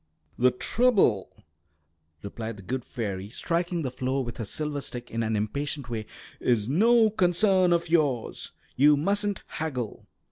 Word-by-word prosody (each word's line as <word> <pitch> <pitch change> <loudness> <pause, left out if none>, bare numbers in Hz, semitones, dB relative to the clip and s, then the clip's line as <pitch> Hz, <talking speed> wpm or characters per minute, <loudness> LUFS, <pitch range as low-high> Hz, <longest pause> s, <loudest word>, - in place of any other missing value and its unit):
"The 125 +1 +6
trouble," 160 - +2 0.9
replied 110 +2 -6
the 100 - -11
good 125 +5 -3
fairy, 100 -6 -5
striking 170 +6 -1
the 130 - -2
floor 130 +1 -1
with 120 -1 -7
her 115 - -3
silver 150 +5 -2
stick 120 -2 -6
in 115 - -2
an 110 -1 0
impatient 135 +4 -2
way, 110 -2 -4 0.3
"is 110 -4 +1
no 220 - +4
concern 185 -1 +3
of 170 0 +2
yours. 145 -8 0 0.2
You 145 +2 +5
mustn't 200 +5 0
haggle." 130 -9 -5
135 Hz, 145 wpm, -27 LUFS, 115-175 Hz, 0.9 s, The